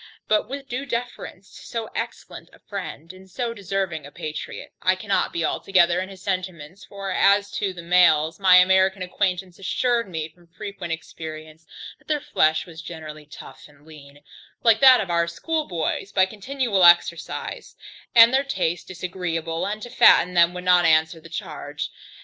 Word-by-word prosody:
But 215 +1 +1
with 275 0 -7
due 265 +2 -5
deference 235 -5 -6
to - - -12
so 230 -2 -5
excellent - - -7
a - - -17
friend, 180 -4 -8
and 190 +1 -16
so 230 +5 -3
deserving 195 -6 -3
a 140 - -12
patriot, 155 +1 -7
I 185 - +3
cannot 200 +1 -1
be 170 -1 -2
altogether 175 0 +2
in 190 +1 -4
his 190 -1 -13
sentiments; 185 -2 -5
for 195 -1 -6
as 200 +2 +3
to 200 -2 -2
the 175 -2 -10
males, 170 -2 +3
my 190 -2 +6
American 190 +1 +4
acquaintance 180 -1 -2
assured 235 +3 0
me 160 -3 -4
from 170 +2 -25
frequent 190 0 -8
experience, 160 -1 -8 0.3
that - - -29
their 300 -1 0
flesh 155 - +1
was 165 -2 -11
generally 155 -3 -9
tough 150 - -12
and 145 0 -23
lean, 145 -2 -15 0.4
like 225 -2 +5
that 260 -3 +7
of 185 -4 -4
our 170 0 +1
schoolboys, 195 - -3
by 190 -1 +3
continual 215 0 -1
exercise, 170 -1 +2 0.4
and 230 +1 +8
their 270 +1 +3
taste 180 -10 -2
disagreeable, 170 -3 -4
and 210 +1 -5
to 240 - -7
fatten 180 -7 +5
them 170 0 +4
would 180 - -6
not 180 -1 +4
answer 160 0 +3
the 165 +1 -14
charge. 165 - -6
180 Hz, 170 wpm, -23 LUFS, 165-200 Hz, 0.4 s, and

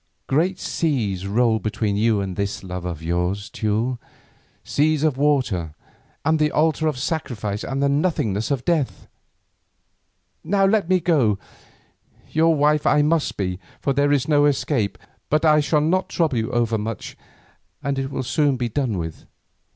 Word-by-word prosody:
Great 175 +7 +1
seas 110 - -1
roll 110 +2 +2
between 105 -1 -1
you 110 0 +2
and 95 -2 -4
this 100 +1 -3
love 90 -1 -6
of 85 -3 -5
yours, 90 +4 -2
Teule, 115 +4 -1 0.6
seas 155 0 +1
of 155 -4 +2
water, 125 - 0 0.5
and 160 0 +3
the 150 0 +3
altar 160 0 +2
of 150 -4 -1
sacrifice, 120 -8 -3
and 135 +1 -2
the - - +4
nothingness 140 - 0
of 135 -4 -1
death. 160 -6 -1 1.4
Now 195 0 +2
let 195 -3 +2
me 185 -1 +4
go. 140 - +2 0.9
Your 165 +1 +3
wife 150 +1 +2
I 150 - +4
must 155 0 +1
be, 90 -2 -2 0.2
for 140 - 0
there 145 +1 +2
is 140 -3 +2
no 145 -2 +4
escape, 130 -6 0 0.3
but 155 +2 +2
I 155 -1 +6
shall 150 +1 +2
not 180 +5 +1
trouble 160 -8 0
you 110 - -2
over 115 -2 +1
much, 110 +1 -5 0.7
and 140 0 -1
it 135 0 -2
will 135 - -3
soon 140 +2 +1
be 120 -1 -2
done 125 -5 -1
with. 80 -2 -6
135 Hz, 160 wpm, -22 LUFS, 105-155 Hz, 1.4 s, I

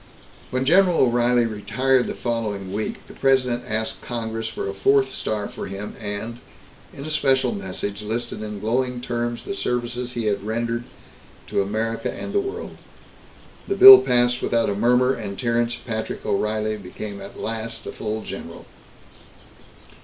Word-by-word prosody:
When 130 +1 -1
General 180 +3 +5
O'Reilly 120 -1 +3
retired 115 +4 +1
the - - -4
following 105 -5 -3
week, 105 +1 -4
the - - -13
President 125 -3 +2
asked 110 0 -2
Congress 115 -2 -4
for - - -4
a 100 - -3
fourth 135 +7 +3
star 105 -4 -3
for - - -7
him 100 +2 -6
and, 105 +3 -4 0.5
in 140 - -9
a 155 - -4
special 135 -4 +2
message, 100 +1 -5
listed 110 +2 -4
in 105 -1 -5
glowing 125 +4 0
terms 120 -1 -3
the - - -3
services 125 -5 -2
he 115 -2 -3
had 100 -2 0
rendered 115 +2 -2 0.6
to - - +1
America 110 +3 -2
and - - -6
the 405 - +3
world. 400 +3 -5 0.9
The 395 - 0
bill 395 0 +12
passed 120 0 +2
without 115 -3 +1
a - - -2
murmur, 125 +4 +3
and 100 -5 -6
Terence 120 0 0
Patrick 110 -2 -5
O'Reilly 110 +1 0
became 100 +1 -7
at 100 - -10
last 115 0 -5
a - - -5
full 110 0 -4
general. - - -8
115 Hz, 155 wpm, -23 LUFS, 105-125 Hz, 0.9 s, bill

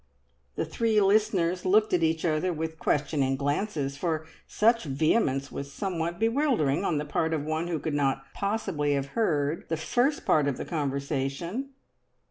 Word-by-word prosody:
The - - -1
three 225 -2 +1
listeners 195 -3 +2
looked 210 +3 +3
at 180 - +3
each 160 0 +1
other 160 +2 +1
with 160 -1 -4
questioning 140 -2 +1
glances, 145 0 -2
for 160 0 -1 0.2
such 230 -1 +2
vehemence 140 - +1
was 140 0 -6
somewhat 170 -1 -3
bewildering 225 - +2
on 170 -5 +1
the 150 - -2
part 160 +2 0
of 145 -2 -3
one 155 +2 -1
who 170 -2 -1
could 155 0 -3
not 135 -2 0
possibly 190 -8 -1
have 140 -1 -1
heard 155 -6 0
the 165 - 0
first 250 - 0
part 150 -2 +3
of 140 - -1
the - - -5
conversation. 145 - -3
160 Hz, 160 wpm, -27 LUFS, 145-200 Hz, 0.2 s, looked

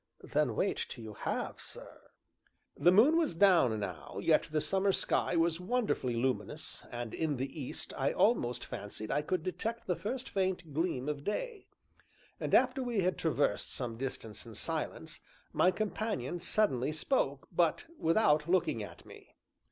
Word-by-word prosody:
"Then - - +1
wait - - 0
until 115 - -8
you 110 -1 -7
have, - - -3
sir." - - -9 0.7
The 175 - +5
moon 250 - +6
was 320 - +1
down 165 - +5
now, 90 -8 -6
yet - - +3
the 155 - +2
summer 195 +5 +2
sky 180 - +1
was 165 0 +2
wonderfully 185 - 0
luminous 125 +2 -2
and 120 -2 -5
in 155 -4 -1
the 135 +4 -4
east 130 - -5
I 135 +1 +1
almost 125 - +2
fancied 105 +1 -6
I 145 - +2
could 160 +2 -1
detect 225 +5 -3
the 180 - 0
first 250 +7 -4
faint 185 -5 -1
gleam 155 -4 -1
of 145 -1 -3
day. 435 - -3 0.7
And - - +1
after 270 - +4
we 240 -5 0
had 185 +1 +1
traversed 155 -3 0
some 120 -3 -4
distance 115 -5 -5
in - - -11
silence, - - -4 0.3
my 180 - +5
companion 205 - -2
suddenly 170 - +1
spoke, 150 - 0
but 170 - +2
without 160 -3 +3
looking 175 -11 +2
at 95 -5 -9
me. - - -15
165 Hz, 160 wpm, -32 LUFS, 130-200 Hz, 0.7 s, moon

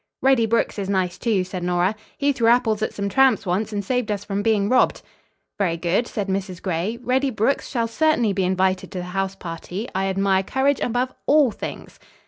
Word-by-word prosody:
"Reddy 260 -4 +4
Brooks 230 -1 0
is 195 -1 -3
nice, 185 -3 -1
too," 215 -6 +1
said 185 0 -6
Nora. 180 +3 +1 0.2
"He 285 0 +2
threw 235 -3 +1
apples 230 -2 +3
at 220 - -1
some 200 0 -3
tramps 265 +1 +3
once, 195 +5 -1
and 205 -2 -3
saved 250 0 -1
us 205 -1 -2
from 200 0 -2
being 205 -2 +2
robbed." 255 +4 +2 0.6
"Very 175 -4 +1
good," 180 +8 0
said 205 -3 -3
Mrs. 190 -2 -3
Gray. 185 +5 -2
"Reddy 260 +3 +1
Brooks 225 +3 0
shall 235 -3 0
certainly 240 -3 +2
be 190 0 0
invited 185 0 0
to - - -5
the 180 - -3
house 195 0 -1
party. 180 +4 -6
I 190 +1 0
admire 195 0 +2
courage 265 +7 +1
above 250 +2 -1
all 290 -4 +5
things." - - -8
205 Hz, 200 wpm, -22 LUFS, 190-240 Hz, 0.6 s, all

